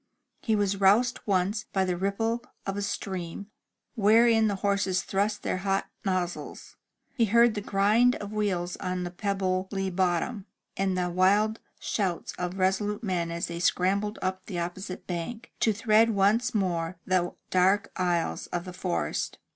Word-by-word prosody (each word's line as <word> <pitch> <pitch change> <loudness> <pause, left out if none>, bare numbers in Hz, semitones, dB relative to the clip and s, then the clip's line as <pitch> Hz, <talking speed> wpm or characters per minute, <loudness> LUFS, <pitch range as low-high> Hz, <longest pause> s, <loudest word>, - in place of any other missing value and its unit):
He 220 - +1
was 200 -1 0
roused 230 +6 +4
once 200 +2 +1
by 190 -1 +1
the 180 -1 0
ripple 225 +6 -1 0.2
of 195 - -2
a 205 - -2
stream, 190 0 -4 0.4
wherein 225 0 +5
the 205 - 0
horses 195 -1 0
thrust 205 +2 -1
their - - -1
hot 195 +1 -1
nozzles, 185 -2 -3 0.4
he 240 -5 +2
heard 235 +2 +5
the 205 - -3
grind 210 +6 +3
of 205 +1 -7
wheels 185 -5 -1
on 180 -1 -3
the 175 - -4
pebbly 190 0 -1
bottom, 185 +4 0 0.3
and 190 -1 0
the 180 -1 0
wild 205 +5 +3 0.2
shouts 185 -6 -2
of 180 0 -2
the - - -9
resolute 200 +3 0
men 180 -5 -1
as 170 0 -2
they 170 0 -5
scrambled 195 +4 +1
up 185 0 -2
the 185 - -4
opposite 180 +2 -5
bank, 180 +7 -5
to 225 - +3
thread 220 +1 +4
once 220 +4 +2
more 175 -3 -1
the 180 -1 +1 0.2
dark 190 +2 +3
aisles 175 -2 -1
of 175 0 -4
the 180 - -7
forest. 85 - -2
195 Hz, 160 wpm, -27 LUFS, 180-210 Hz, 0.4 s, wherein